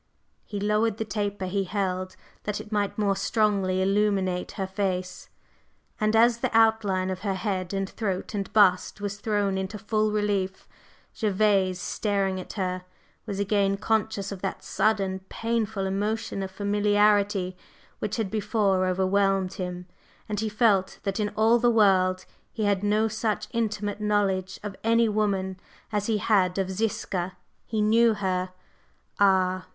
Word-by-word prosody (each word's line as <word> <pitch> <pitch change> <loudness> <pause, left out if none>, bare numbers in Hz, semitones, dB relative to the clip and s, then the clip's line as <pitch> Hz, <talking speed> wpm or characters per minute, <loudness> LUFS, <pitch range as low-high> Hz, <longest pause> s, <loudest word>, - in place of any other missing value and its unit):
He 205 - -5
lowered 210 +1 +1
the 220 - -2
taper 205 -1 -2
he 195 +1 -1
held 185 -1 -2 0.3
that 210 -1 -2
it 210 - -10
might 205 -2 -1
more 200 -2 +2
strongly 195 -2 +1
illumine 195 -2 +1
her 195 - -1
face, 185 -1 -3 0.7
and 215 +1 +2
as 235 +1 +5
the 255 - 0
outline 210 -5 +3
of 185 - -4
her 195 -1 -2
head 185 -2 -2
and 195 -1 -1
throat 195 -2 -3
and 200 -2 -3
bust 190 -3 +3
was 200 0 -4
thrown 205 -2 0
into 190 +3 -4
full 215 +1 0
relief, 200 -3 -1 0.5
Gervase, 195 -3 +2
staring 195 -1 -1
at 185 - -8
her, 185 -2 -2 0.4
was 200 -2 -3
again 200 -1 +1
conscious 215 -1 -1
of 195 -2 -7
that 195 - -4
sudden, 195 -3 0
painful 220 -3 -1
emotion 205 +1 -2
of 190 - -3
familiarity 205 -1 +2 0.4
which 210 - -2
had 220 -5 -2
before 205 -3 +1
overwhelmed 190 0 +1
him, 180 -2 -5 0.4
and 210 -1 -2
he 220 0 -1
felt 210 -3 +2
that 195 +1 -2
in 210 -1 0
all 225 +2 +4
the 240 +1 +4
world 185 -4 +3 0.3
he 220 - -3
had 200 -2 +2
no 210 +2 +2
such 215 -1 -2
intimate 210 -3 -2
knowledge 195 -3 0
of 205 -2 -5
any 230 +1 +4
woman 195 -3 -1 0.3
as 210 -1 -1
he 220 -2 +2
had 190 -3 +2
of 190 -1 -1
Ziska. 190 -3 -2 0.3
He 220 -2 0
knew 225 +1 +4
her! 185 -2 -1 0.7
Ah! 185 -2 +3
200 Hz, 150 wpm, -26 LUFS, 190-215 Hz, 0.7 s, as